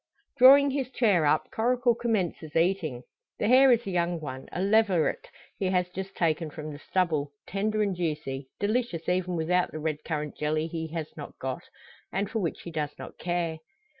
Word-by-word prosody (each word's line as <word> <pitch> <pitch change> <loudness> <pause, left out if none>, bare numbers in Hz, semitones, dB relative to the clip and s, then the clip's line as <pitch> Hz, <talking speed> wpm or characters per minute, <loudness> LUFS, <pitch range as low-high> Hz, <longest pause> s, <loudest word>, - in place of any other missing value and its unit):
Drawing 275 +2 +8
his 265 -2 -2
chair 205 - +3
up, 155 +1 +1
Coracle 245 +1 +2
commences 190 -10 -2
eating. 165 -7 +1 0.3
The 210 - 0
hare 260 +2 +7
is 240 -1 +3
a 195 - -3
young 175 -1 0
one 130 -4 -7
a - - -4
leveret 195 -4 +2 0.3
he 195 - 0
has 180 -1 +1
just 190 +1 -6
taken 165 -1 0
from 155 0 -7
the 145 - -9
stubble 155 -4 0
tender 215 +2 0
and 200 -2 -1
juicy 150 -6 -3
delicious 205 -5 -1
even 180 0 0
without 175 +2 +1
the - - -6
red 155 -1 -3
currant 150 -2 -3
jelly 155 +1 0
he 160 0 -4
has 160 -1 -6
not 150 - -9
got, 130 -1 -4 0.5
and 200 +2 -2
for 225 - -1
which 170 -6 -3
he 170 - -7
does 150 -2 -3
not - - -10
care. 175 -2 -2
175 Hz, 185 wpm, -28 LUFS, 155-205 Hz, 0.5 s, Drawing